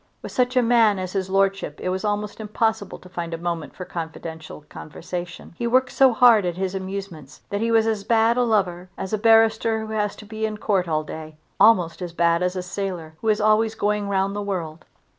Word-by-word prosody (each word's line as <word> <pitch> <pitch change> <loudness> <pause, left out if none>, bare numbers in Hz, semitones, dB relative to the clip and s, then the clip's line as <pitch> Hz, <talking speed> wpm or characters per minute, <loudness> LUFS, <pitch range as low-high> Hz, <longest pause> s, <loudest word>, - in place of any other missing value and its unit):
With - - -7
such 250 0 0
a 250 - +5
man 230 -3 +4
as 185 -1 -5
his 190 -1 -2
lordship 195 -5 0
it 185 - -3
was 185 +2 -2
almost 210 0 -2
impossible 220 -1 -1
to - - -15
find 170 -2 -5
a - - -6
moment 170 -2 -4
for 185 - -7
confidential 160 -2 -7
conversation. 175 +3 -8
He 235 - -1
worked 255 +2 +2
so 265 -1 +5
hard 235 -3 +6
at 175 -1 -2
his 190 0 -2
amusements 190 -7 -7
that 200 +1 -1
he 230 - 0
was 225 -1 +4
as 220 -3 -1
bad 225 +2 +3
a 250 - +2
lover 185 -6 0
as 190 +2 -5
a 215 - +1
barrister 225 0 +3
who 220 - -6
has 210 -1 -1
to 210 - -12
be 220 +1 -6
in 215 -1 -1
Court 195 -4 0
all 155 -1 0
day, 155 0 -9 0.2
almost 180 -6 +4
as 175 -2 -5
bad 170 0 +2
as 180 +1 0
a 185 - -3
sailor 180 -4 -5
who 225 - -4
is 215 0 +3
always 215 +1 +2
going 210 -1 -1
round 195 0 0
the 205 - -2
world. 170 -6 -4
200 Hz, 220 wpm, -23 LUFS, 175-220 Hz, 0.2 s, hard